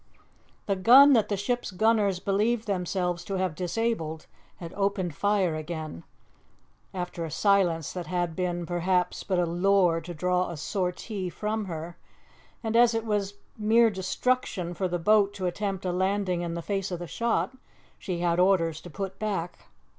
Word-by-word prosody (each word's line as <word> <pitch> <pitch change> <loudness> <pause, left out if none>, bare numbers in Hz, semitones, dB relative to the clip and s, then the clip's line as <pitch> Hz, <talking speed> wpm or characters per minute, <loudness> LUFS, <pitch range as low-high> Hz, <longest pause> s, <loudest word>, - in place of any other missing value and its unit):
The 200 - 0
gun 260 +9 +8
that 225 -4 +3
the 205 - 0
ship's 240 +5 -2
gunners 205 -1 +2
believed 215 +4 0
themselves 180 -3 -1
to 195 - -3
have 185 -3 -1
disabled 175 -3 -2 0.3
had 170 -2 -9
opened 195 -4 -1
fire 195 -1 +1
again, 155 - -6 0.9
after 180 -2 -4
a 165 - -4
silence 175 -2 +2
that 180 -3 -5
had 175 -2 -1
been, 175 -1 -2
perhaps, 180 +1 0
but 190 -2 -1
a 175 - +2
lure 175 0 +2
to 175 +2 -7
draw 180 +2 0
a 170 - -6
sortie 185 +3 -3
from 215 +3 -3
her; 170 -1 -6 0.7
and 225 0 -2
as 235 0 +5
it 225 0 -1
was 205 -2 -1 0.2
mere 225 +2 +4
destruction 190 -1 -1
for 185 +1 -1
the 175 0 -1
boat 205 +3 +3
to 185 - -4
attempt 195 +1 -2
a 180 - 0
landing 185 -1 0
in 170 -1 -3
the 170 - -5
face 195 0 -2
of 180 - -3
the 175 - -6
shot, 235 +7 -1 0.4
she 180 -4 -4
had 175 0 +1
orders 180 -4 +2
to 175 - -10
put 195 +2 -6
back. 190 -5 -4
185 Hz, 170 wpm, -27 LUFS, 175-205 Hz, 0.9 s, gun